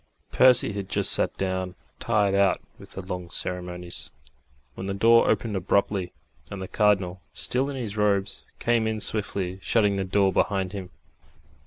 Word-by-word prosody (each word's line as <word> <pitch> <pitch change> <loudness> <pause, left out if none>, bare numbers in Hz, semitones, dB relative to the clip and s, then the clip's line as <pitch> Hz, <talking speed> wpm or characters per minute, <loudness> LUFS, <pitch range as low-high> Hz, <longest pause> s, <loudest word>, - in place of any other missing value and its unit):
Percy 125 -4 +5
had 100 -2 -5
just - - +2
sat - - 0
down, 95 -1 -2 0.2
tired 105 -4 +1
out 100 -1 +3 0.2
with - - -12
the 95 - -7
long 90 -2 -5
ceremonies, 90 -1 -5 0.6
when 95 - -6
the 100 - -2
door 115 +3 +5
opened 110 0 0
abruptly, 95 0 0 0.4
and 100 - -6
the 95 - -5
Cardinal, 95 -4 +1
still 130 +3 -1
in 140 - -5
his 110 -5 -5
robes, 100 -2 +1
came 115 -2 +1
in 110 -1 -2
swiftly, 100 -3 0
shutting 105 -1 +2
the 95 - 0
door 95 0 +2
behind 95 -2 0
him. 95 -3 -7
100 Hz, 160 wpm, -25 LUFS, 95-105 Hz, 0.6 s, Percy